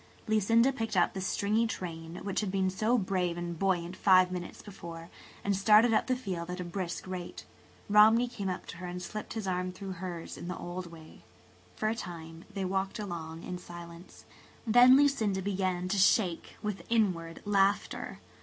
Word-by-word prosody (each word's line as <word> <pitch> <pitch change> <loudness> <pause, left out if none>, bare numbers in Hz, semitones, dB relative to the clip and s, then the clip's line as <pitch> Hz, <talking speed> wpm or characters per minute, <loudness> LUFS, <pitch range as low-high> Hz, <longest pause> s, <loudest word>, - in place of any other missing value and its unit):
Lucinda 225 +4 +4
picked 225 -5 -3
up 175 - +3
the 190 - -4
stringy 210 +4 +1
train, 165 -5 -6
which 195 -1 -1
had 210 - -2
been 190 -1 +1
so 220 +6 +2
brave 185 -4 -1
and 170 -1 -5
buoyant 185 -2 0
five 185 -2 +5
minutes 180 -1 -6
before, 170 -4 -9 0.3
and 200 0 +1
started 215 +4 +5
up - - +2
the 255 - +2
field 185 -8 -4
at 180 +1 -4
a - - -2
brisk 175 0 -4
rate. 185 -2 -6 0.4
Romney 220 +4 +6
came 210 -6 -4
up 185 - -4
to - - -9
her 180 +1 -6
and 180 0 -5
slipped 215 +2 -6
his 220 -3 -4
arm 180 0 -1
through 190 +1 -7
hers 180 -2 -6
in - - -7
the 180 - -4
old 175 +1 -6
way. 160 -2 -13 0.5
For 215 - -1
a 220 - +2
time 165 -5 -8
they 195 -2 -3
walked 190 +2 -1
along 170 -5 -6
in 180 - -5
silence. 175 0 -11 0.4
Then 245 +3 +7
Lucinda 250 -9 +2
began 185 -2 -1
to 200 +1 +1
shake 185 -3 +2
with 210 -2 -3
inward 180 -8 0
laughter. 200 0 +1
190 Hz, 180 wpm, -30 LUFS, 175-210 Hz, 0.5 s, Then